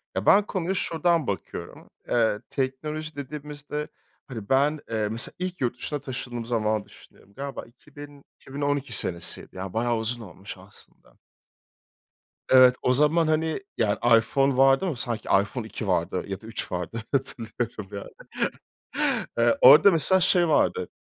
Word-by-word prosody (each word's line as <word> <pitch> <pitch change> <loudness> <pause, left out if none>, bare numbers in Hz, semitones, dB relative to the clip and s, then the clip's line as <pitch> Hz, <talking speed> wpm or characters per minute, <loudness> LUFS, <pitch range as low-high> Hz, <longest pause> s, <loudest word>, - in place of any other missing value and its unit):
Ya, - - -2
ben 205 - +6
konuya 185 -1 -2
şuradan 170 -4 0
bakıyorum, 95 -5 -6 0.2
ııı, 110 -3 +1
teknoloji 150 +4 -4
dediğimizde, 150 +1 -6 0.4
hani 110 -6 -8
ben, 145 +3 +2
ııı, 110 -2 -1
mesela 115 +1 -3
ilk 185 -2 -4
yurt 125 -1 -1
dışına 145 +3 -3
taşındığım 120 -2 -5
zamanı 110 -3 -1
düşünüyorum. 100 - -19
Galiba 140 +4 -6
2000-2012 145 0 -6
senesiydi, 85 -3 +1
ya 95 0 -6
bayağı 120 +1 0
uzun 115 +2 -3
olmuş 95 -7 -10
aslında. - - -17 1.3
Evet, 130 -1 +7
o 125 - +2
zaman, 150 +4 +3
hani, 160 +3 0 0.2
ya, 105 -2 +1 0.2
iPhone 135 +4 +1
vardı 135 +5 +4
ama 165 -7 -2
sanki 120 -2 -4
iPhone 110 +2 -6
2 110 0 -6
vardı 90 0 0
ya 95 -1 -5
da 110 - -13
3 115 -2 -6
vardı 90 +6 -4
hatırlıyorum 115 -5 -3
yani. 100 -1 -10 1.1
Eee, 115 0 +3
orada 145 +9 +9
mesela 180 +4 +5
şey 180 -1 +4
vardı, 150 - +1
130 Hz, 140 wpm, -25 LUFS, 110-150 Hz, 1.3 s, orada